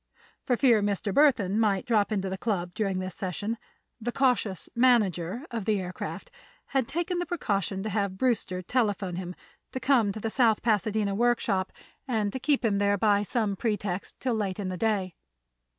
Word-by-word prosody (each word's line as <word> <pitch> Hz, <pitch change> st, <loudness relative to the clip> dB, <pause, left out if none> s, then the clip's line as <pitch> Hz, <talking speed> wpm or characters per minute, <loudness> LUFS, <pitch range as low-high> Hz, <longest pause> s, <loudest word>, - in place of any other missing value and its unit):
For 245 Hz, -, +2 dB
fear 235 Hz, -5 st, +5 dB
Mr. 200 Hz, 0 st, -1 dB
Burthon 225 Hz, -9 st, +4 dB
might 200 Hz, -4 st, +2 dB
drop 220 Hz, -3 st, +2 dB
into 195 Hz, -2 st, -1 dB
the 190 Hz, -, -2 dB
Club 180 Hz, -6 st, -2 dB
during 200 Hz, -4 st, -1 dB
this 185 Hz, 0 st, -4 dB
session, 205 Hz, +5 st, -3 dB, 0.4 s
the 240 Hz, +2 st, -2 dB
cautious 240 Hz, -8 st, +1 dB
"manager" 230 Hz, -, +2 dB
of 225 Hz, -4 st, -3 dB
the 210 Hz, -2 st, +2 dB
aircraft 180 Hz, -1 st, -6 dB, 0.4 s
had 265 Hz, -4 st, +1 dB
taken 345 Hz, +2 st, -2 dB
the 350 Hz, -, -1 dB
precaution 200 Hz, -, -1 dB
to 215 Hz, -, -2 dB
have 200 Hz, -2 st, -1 dB
Brewster 205 Hz, -6 st, 0 dB
telephone 205 Hz, -5 st, 0 dB
him 180 Hz, -1 st, -5 dB, 0.4 s
to 260 Hz, -, -3 dB
come 250 Hz, -5 st, +3 dB
to 215 Hz, -, -6 dB
the 220 Hz, +1 st, -3 dB
South 230 Hz, -4 st, +3 dB
Pasadena 215 Hz, -2 st, +1 dB
workshop, 220 Hz, -4 st, +1 dB, 0.4 s
and 215 Hz, -5 st, 0 dB
to 260 Hz, -, -3 dB
keep 275 Hz, -2 st, +1 dB
him 200 Hz, -3 st, +2 dB
there 205 Hz, 0 st, +2 dB
by 205 Hz, 0 st, +3 dB
some 210 Hz, -1 st, -1 dB
pretext 205 Hz, -3 st, -3 dB
till 255 Hz, -2 st, 0 dB
late 200 Hz, -4 st, -1 dB
in 200 Hz, -3 st, -3 dB
the 185 Hz, -, -3 dB
day. 200 Hz, -4 st, 0 dB
210 Hz, 180 wpm, -28 LUFS, 195-235 Hz, 0.4 s, fear